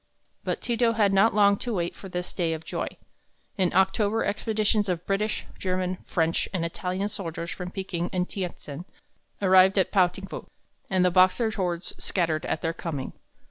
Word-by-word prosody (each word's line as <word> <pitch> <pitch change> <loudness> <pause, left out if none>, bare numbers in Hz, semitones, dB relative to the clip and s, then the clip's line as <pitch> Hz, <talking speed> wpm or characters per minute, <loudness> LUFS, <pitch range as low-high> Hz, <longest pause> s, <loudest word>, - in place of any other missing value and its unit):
But - - -2
Ti 235 -2 -1
to 230 -1 +3
had 210 -3 +3
not 195 +3 +4
long 200 -1 +5
to 240 0 -3
wait 170 -2 -2
for 195 - -10
this 180 0 -4
day 170 -3 0
of 160 0 -6
joy - - -3 0.7
In 185 -3 +2
October 200 +3 +2
expeditions 210 0 +1
of 175 -1 -2
British, 210 +2 -1
German, 185 -1 -1
French, 165 -1 +1
and 180 -3 -1
Italian 185 +3 -2
soldiers 170 -4 -5
from 180 -1 -5
Peking 180 -2 -3
and 180 -1 0
Tientsin 175 -4 -6 0.6
arrived 190 +1 +6
at 190 - +3
Pao 185 -3 +5
ting 185 +2 -9
fu, - - -8 0.4
and 185 -1 +3
the 180 - +4
Boxer 185 +5 +4
hordes 180 -4 -2
scattered 165 -4 0
at - - -2
their 165 0 0
coming. 150 -6 -5
185 Hz, 180 wpm, -26 LUFS, 175-200 Hz, 0.7 s, arrived